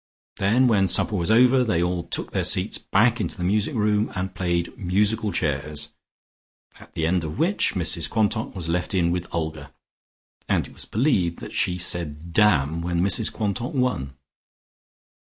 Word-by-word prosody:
Then 110 +7 +3
when 100 -5 +3
supper 105 - +3
was 85 -3 -1
over 125 +3 +5
they 90 -8 +1
all 90 0 -1
took - - -2
their - - -1
seats - - +1
back 115 +4 +2
into - - -4
the 90 - -4
music 105 +9 0
room 105 -1 +1
and 95 0 -3
played 85 -3 -2
musical 105 +3 0
chairs, 75 -2 -2 0.9
at - - -17
the 80 - -1
end 90 +1 +1
of 75 -1 -5
which 170 - +1
Mrs 85 -2 +1
Quantock 110 0 0
was 90 -4 -4
left 90 +3 -1
in 85 -2 +2
with 90 0 -3
Olga, 80 -3 -4 0.8
and - - +1
it - - -13
was - - -6
believed 100 - 0
that - - -9
she 90 - 0
said 85 -2 -2
"Damn," 85 -7 +3
when 85 0 -2
Mrs 100 +5 0
Quantock 110 +4 -3
won. 115 - -1
95 Hz, 170 wpm, -23 LUFS, 85-110 Hz, 0.9 s, over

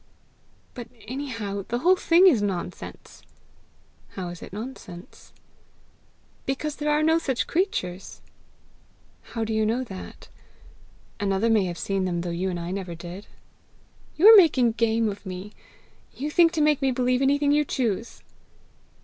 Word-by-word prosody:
"But 240 -1 -8 0.2
anyhow 230 -7 -4
the 240 - -1
whole 355 +9 +4
thing 350 0 +4
is 285 - +5
nonsense!" 180 -3 -5 0.9
"How 185 -2 -5
is 175 -1 -9
it - - -10
nonsense?" 200 -5 -10 1.2
"Because 290 +2 -3
there 300 0 -2
are 300 +1 +2
no 320 +1 +3
such 265 -6 -1
creatures." 195 - -2 1.0
"How 230 - -5
do 220 0 -2
you 220 0 +1
know 230 +4 0
that? 190 -6 -10 0.9
Another 200 +3 +1
may 215 -4 +3
have 175 -1 -4
seen 195 +1 -1
them 175 -2 -2
though 175 0 -4
you 180 +3 -2
and 175 -1 -3
I 170 +1 -5
never 185 -3 -5
did!" 175 +4 -9 0.9
"You 335 - +2
are - - +10
making 270 - +5
game 225 0 +1
of 205 -1 -5
me! 190 +1 -7 0.6
You 295 +3 -4
think 335 +1 +5
to 315 - 0
make 300 -1 +3
me 270 - +2
believe 250 0 +1
anything 285 +1 +2
you 300 +1 +3
choose!" 235 -5 -3
230 Hz, 150 wpm, -25 LUFS, 190-285 Hz, 1.2 s, are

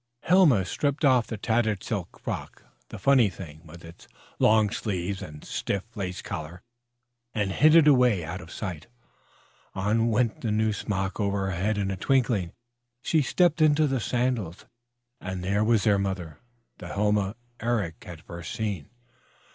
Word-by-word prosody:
Helma 165 - +5
stripped 145 - -1
off 130 -4 +4
the 110 - -5
tattered 110 -2 0
silk 100 -5 -4
frock, - - -6 0.3
the - - -8
funny 135 -6 +4
thing 80 -5 -10
with 85 +2 -12
its 85 +1 -14 0.3
long 110 -1 +4
sleeves 95 -3 -3
and 75 -1 -9
stiff 100 -1 -2
lace 95 -3 -4
collar, 85 0 -6 0.7
and 105 -3 0
hid 155 +10 +5
it 165 -3 +7
away 125 - +4
out 90 +4 -6
of 85 - -12
sight. 90 -5 -6 0.9
On 110 +4 +1
went 115 0 0
the 115 - -2
new 110 0 +1
smock 95 -1 -3
over 100 -1 0
her 95 -2 -2
head 100 +5 0
in 100 -1 -1
a 95 - -3
twinkling. 115 -7 +1 0.5
She 160 - +2
stepped 165 +3 +2
into 155 0 +5
the 135 -3 0
sandals. 115 -5 -2 0.5
And 95 -1 -5
there 100 +3 +1
was 110 -2 +3
their 105 -3 +3
mother, 95 -6 -4 0.4
the - - -8
Helma 105 0 0 0.2
Eric 110 -8 -2
had 85 -3 -10
first 85 -1 -8
seen. 100 -9 -3
105 Hz, 160 wpm, -26 LUFS, 90-120 Hz, 0.9 s, it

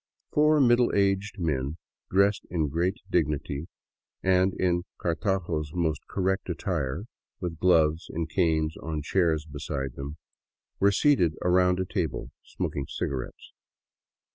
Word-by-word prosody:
Four 150 0 +4
middle 120 -2 +5
aged 100 +1 +1
men, 75 -4 -1 0.3
dressed 100 +2 +2
in 80 -4 0
great 85 +6 0
dignity 75 -2 0 0.6
and 95 0 +4
in 85 -1 +1 0.2
Cartago's 85 -4 -1
most 80 -4 0
correct 95 0 -1
attire, 70 +8 -2 0.4
with 85 -3 -4
gloves 80 -3 +3
and 80 0 -3
canes 80 -2 +1
on 80 -2 -4
chairs 80 -2 +1
beside 70 -3 -4
them, 70 +3 -7 0.6
were 100 +1 +5
seated 100 - +3
around 90 0 +3
a 95 - 0
table, 90 -6 -3
smoking 70 - -4
cigarettes. 65 -2 -5
85 Hz, 120 wpm, -27 LUFS, 75-95 Hz, 0.6 s, middle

